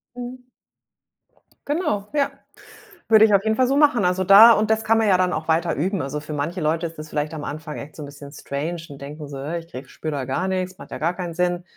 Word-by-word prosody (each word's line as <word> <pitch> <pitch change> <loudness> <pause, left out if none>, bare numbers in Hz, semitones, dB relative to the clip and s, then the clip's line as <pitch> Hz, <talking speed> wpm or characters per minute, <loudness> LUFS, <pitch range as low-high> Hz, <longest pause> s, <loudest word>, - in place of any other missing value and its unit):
Mhm. 250 +1 -8 1.2
Genau, 290 - -1
ja, 285 -2 +2 0.8
würde 220 -1 +7
ich 215 - +2
auf 200 -1 +4
jeden 220 0 +1
Fall 255 - +3
so 270 - +1
machen. 280 -8 +4
Also 180 +1 +1
da 200 +5 +9
und 215 -1 +2
das 220 0 +1
kann 225 +1 +3
man 220 - +2
ja 190 -2 +5
dann 180 0 +1
auch 155 +1 -4
weiter 165 +1 +1
üben. 185 +5 -1
Also, 140 +2 -4
für 155 +1 -9
manche 160 +5 -3
Leute 160 +2 0
ist 165 -1 -7
das 155 0 -8
vielleicht 150 +1 -2
am 155 -2 -6
Anfang 155 +1 -6
echt 145 +1 -10
so 155 - -8
'n - - -6
bisschen 140 0 -11
strange 145 +4 -4
und 140 -1 -11
denken 150 +2 -8
so: 135 -1 -7
„Ich 170 -1 -5
kriege 130 +1 -9
spüre 155 - -5
da 140 -3 -3
gar 135 +8 -2
nix, 185 -1 -2
macht - - -13
ja - - -6
gar 170 +3 0
keinen 175 -2 -5
Sinn.“ 175 +1 -1
175 Hz, 250 wpm, -22 LUFS, 150-210 Hz, 1.2 s, da